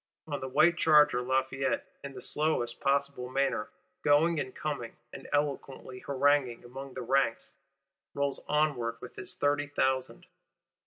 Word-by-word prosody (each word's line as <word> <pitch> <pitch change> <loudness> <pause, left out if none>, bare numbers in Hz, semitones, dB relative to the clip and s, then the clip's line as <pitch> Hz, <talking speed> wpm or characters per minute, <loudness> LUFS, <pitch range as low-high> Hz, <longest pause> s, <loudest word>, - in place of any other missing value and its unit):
On 145 -2 -4
the 130 - -5
white 170 +6 +4
charger, 150 -5 +5
Lafayette, 130 +1 0 0.2
in 140 -1 -7
the 125 - -8
slowest 150 -6 0
possible 140 -2 0
manner, 135 -5 0 0.3
going 150 +3 +4
and 130 - -4
coming, 140 -7 -4 0.2
and - - -9
eloquently 140 -3 -2
haranguing 140 -3 +1
among 135 +2 -9
the 130 - -4
ranks, 135 +1 +1 0.6
rolls 140 -1 -1
onward 140 -6 +1
with 125 - -10
his 185 - -5
thirty 145 0 +1
thousand. 130 -2 -1
140 Hz, 140 wpm, -30 LUFS, 130-145 Hz, 0.6 s, charger